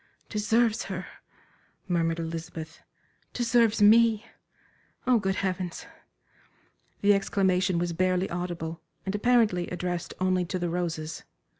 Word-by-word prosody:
"Deserves 225 +2 +1
her!" 185 -1 -5 0.8
murmured 165 -2 +1
Elizabeth, 165 -1 -6 0.5
"deserves 230 -3 +3
me! 225 +1 +5 0.8
Oh, 250 -2 +4
good 195 -2 -1
Heavens!" 185 - -3 1.2
The 205 0 +5
exclamation 190 -2 +1
was 175 0 -1
barely 185 +2 +1
audible, 170 -2 -4 0.2
and 190 - -2
apparently 210 -5 +2
addressed 180 -1 -4
only 185 -1 +2
to 185 +2 -3
the 175 -1 -2
roses. 165 -2 -3
185 Hz, 110 wpm, -27 LUFS, 175-210 Hz, 1.2 s, me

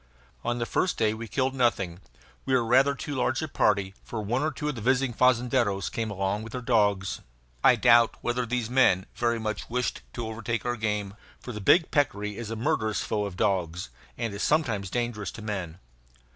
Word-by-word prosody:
On 120 0 -1
the 120 - -1
first 180 +9 0
day 110 -1 +2
we 115 +1 -6
killed 130 +4 0
nothing. 100 -9 0 0.4
We 130 - +1
were 120 -2 +2
rather 135 +4 +4
too 145 - -5
large 130 -1 0
a - - -2
party, 100 -8 +1
for 115 - -5
one 115 +5 -1
or 155 - +1
two 150 0 -5
of 150 - 0
the 115 - -7
visiting 130 +2 +2
fazendeiros 120 -5 +2
came 115 -1 -2
along 95 +1 -1
with 110 +1 -9
their 125 - -3
dogs. 105 -5 +1 0.4
I - - +7
doubt 115 -1 +5
whether 120 0 -1
these 120 -1 -1
men 120 -7 +3
very 120 -1 0
much 110 -2 -4
wished 125 +1 -1
to 120 - -4
overtake 115 +1 -3
our 120 0 0
game, 105 -3 -2 0.3
for 125 - -7
the 105 -2 -6
big 165 - +4
peccary 105 -8 0
is 115 0 -6
a 115 - -3
murderous 110 -1 0
foe 105 -1 -1
of 95 -3 -6
dogs 90 -7 0 0.3
(and 115 -3 -3
is 100 - -5
sometimes 115 - +1
dangerous 120 -4 -2
to 115 - -9
men). 95 -6 -4
115 Hz, 200 wpm, -27 LUFS, 105-125 Hz, 0.4 s, I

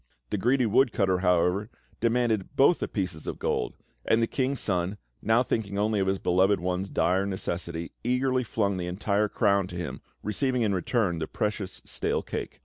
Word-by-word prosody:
The - - +1
greedy 125 +4 +3
woodcutter, 105 -5 +3
however, 90 +3 +2 0.3
demanded 115 -1 +1
both 140 +5 +5
the - - -2
pieces 90 -7 -3
of - - -3
gold; - - -1 0.3
and 110 - +3
the 115 - +3
King's 130 +2 -1
Son, 95 -1 0 0.2
now 115 +3 +3
thinking 100 -5 -2
only 105 0 +1
of 95 - +1
his 95 0 +1
beloved 95 +3 +3
one's 90 +2 -2
dire 95 +3 +1
necessity, 85 -3 -3
eagerly 130 +1 +1
flung 100 -4 0
the 90 -1 -3
entire 100 +3 0
crown 100 -2 +2
to 90 - -9
him, 90 -3 -5 0.2
receiving 125 +4 0
in 105 -2 +1
return 95 -2 0
the 80 - -3
precious 105 -3 -3
stale - - -1
cake. - - -5
100 Hz, 175 wpm, -27 LUFS, 90-115 Hz, 0.3 s, both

